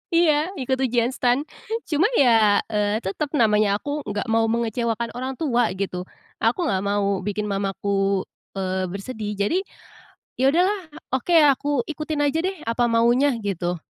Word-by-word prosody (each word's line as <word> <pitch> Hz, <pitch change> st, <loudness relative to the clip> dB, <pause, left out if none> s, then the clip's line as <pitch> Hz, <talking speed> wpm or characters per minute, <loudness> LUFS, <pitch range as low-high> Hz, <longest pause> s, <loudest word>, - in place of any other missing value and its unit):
Iya 335 Hz, -2 st, +5 dB, 0.3 s
ikut 260 Hz, +1 st, -1 dB
ujian 245 Hz, -2 st, +1 dB
STAN, 255 Hz, +1 st, +1 dB, 0.5 s
cuma 315 Hz, +5 st, +3 dB
ya, 225 Hz, -, +4 dB
eee, 210 Hz, +1 st, 0 dB
tetep 200 Hz, +11 st, -2 dB
namanya 210 Hz, -5 st, +3 dB
aku 290 Hz, +8 st, -3 dB
nggak 205 Hz, 0 st, -2 dB
mau 225 Hz, 0 st, +3 dB
mengecewakan 230 Hz, 0 st, -1 dB
orang 260 Hz, +2 st, -5 dB
tua 245 Hz, -6 st, +1 dB
gitu, 185 Hz, -2 st, -4 dB, 0.3 s
aku 230 Hz, +9 st, +1 dB
nggak 195 Hz, -, 0 dB
mau 200 Hz, -1 st, +1 dB
bikin 205 Hz, +2 st, -3 dB
mamaku, 195 Hz, -1 st, -1 dB, 0.3 s
eee, 190 Hz, -1 st, -2 dB
bersedih, 210 Hz, +2 st, -5 dB
jadi 205 Hz, -, +1 dB, 0.8 s
ya 260 Hz, -, +4 dB
udahlah 365 Hz, +8 st, +3 dB, 0.3 s
oke 265 Hz, +7 st, +1 dB, 0.2 s
aku 285 Hz, -, -8 dB, 0.2 s
ikutin 305 Hz, -1 st, -2 dB
aja 290 Hz, +2 st, +1 dB
deh 375 Hz, +3 st, -1 dB
apa 230 Hz, +1 st, 0 dB
maunya 240 Hz, +4 st, +3 dB
gitu. 180 Hz, -3 st, -2 dB
230 Hz, 145 wpm, -23 LUFS, 200-265 Hz, 0.8 s, Iya